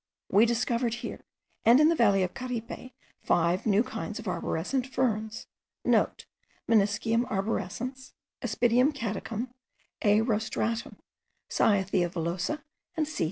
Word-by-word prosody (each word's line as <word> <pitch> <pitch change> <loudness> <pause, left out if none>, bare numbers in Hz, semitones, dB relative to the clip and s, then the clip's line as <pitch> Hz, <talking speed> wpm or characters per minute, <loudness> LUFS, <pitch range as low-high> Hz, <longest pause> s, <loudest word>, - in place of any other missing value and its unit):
We 210 +4 +6
discovered 235 0 0
here, 240 - -6 0.4
and 235 +4 +7
in 305 +1 +6
the 335 - +3
valley 200 -7 +4
of 180 - -2
Caripe, 250 0 -5 0.3
five 175 +4 +1
new 210 +1 +4
kinds 220 -2 -5
of 225 - -7
arborescent 190 +8 -1
ferns.* 225 -4 -1 0.2
(* - - -56
Meniscium 225 +2 +1
arborescens, 225 +5 -3 0.3
Aspidium 245 +5 +3
caducum, 230 -1 -3 0.5
A. 210 0 +4
rostratum, 225 0 -1 0.5
Cyathea 190 -4 +2
villosa, 180 - -2 0.3
and 310 -2 +1
C. 310 - -6
225 Hz, 115 wpm, -28 LUFS, 200-245 Hz, 0.5 s, and